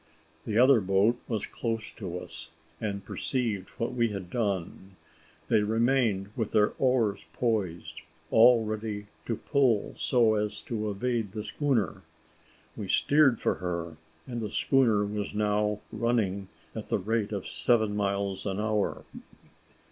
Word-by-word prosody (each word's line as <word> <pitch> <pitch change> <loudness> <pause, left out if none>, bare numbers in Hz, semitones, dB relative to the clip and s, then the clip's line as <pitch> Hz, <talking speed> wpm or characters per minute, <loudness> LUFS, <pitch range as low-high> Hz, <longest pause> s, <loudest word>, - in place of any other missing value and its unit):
The 110 - 0
other 125 -1 +6
boat 100 +5 +3
was 110 -4 -2
close 115 -2 -3
to 90 -5 -6
us, 90 - -6 0.3
and 100 -2 -3
perceived 115 -7 -2
what 115 - -1
had - - -8
been 105 -6 0
done. 95 -4 -3 0.5
They 105 - +4
remained 110 -2 +1
with 110 -3 -2
their 105 -1 +4
oars 125 -6 +2
poised, 105 -8 -2 0.3
all 115 0 +6
ready 105 -1 -4 0.2
to 115 - 0
pull 130 -5 +1
so 115 -4 +3
as 105 0 -2
to 110 -2 -3
evade 110 0 -2
the 105 -1 -4
schooner. 110 - 0 0.7
We - - -5
steered 140 -5 +4
for - - +1
her, 85 -3 -3 0.3
and 120 -2 -4
the 105 - -3
schooner 115 -2 +3
was 105 0 -4
now 105 0 +1
running 110 -4 0 0.3
at - - -7
the - - +2
rate 110 +1 -1
of 100 -3 -3
seven 110 -4 +1
miles 100 -1 -1
an 95 0 -2
hour. 105 -1 -1
105 Hz, 140 wpm, -28 LUFS, 100-115 Hz, 0.7 s, other